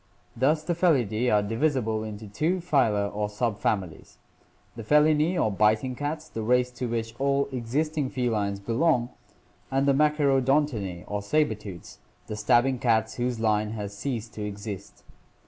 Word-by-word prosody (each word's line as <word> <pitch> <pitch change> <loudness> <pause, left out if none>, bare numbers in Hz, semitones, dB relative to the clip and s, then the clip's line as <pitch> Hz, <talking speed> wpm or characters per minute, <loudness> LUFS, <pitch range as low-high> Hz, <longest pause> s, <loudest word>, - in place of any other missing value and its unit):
Thus 150 +6 +2
the 175 - -1
Felidae 125 - +2
are 105 -1 +3
divisible 115 -1 0
into 110 0 -7
two 155 - 0
phyla 115 - +1
or 105 0 -1
subfamilies, 105 -5 -2 0.6
the 115 - -7
Felinae 150 - +3
or 110 - +2
biting 110 +5 +2
cats, 150 +4 -4
the 115 - -6
race 125 +2 +2
to 125 0 -4
which 115 -1 -3
all 140 0 +1
existing 140 +4 -1
felines 110 -7 -1
belong, 120 +3 +1 0.6
and 135 +1 +1
the 140 - +5
Machaerodon 145 -1 +3
tinae 95 -9 -5
or 105 0 -3
saber 150 +4 +1
tooths, 100 -5 -10 0.3
the 110 - -5
stabbing 120 +4 +2
cats 110 -2 +1
whose 120 -1 -1
line 105 -1 +1
has 105 -2 -5
ceased 115 0 -4
to 105 - -5
exist. 100 -1 -7
120 Hz, 150 wpm, -26 LUFS, 105-140 Hz, 0.6 s, the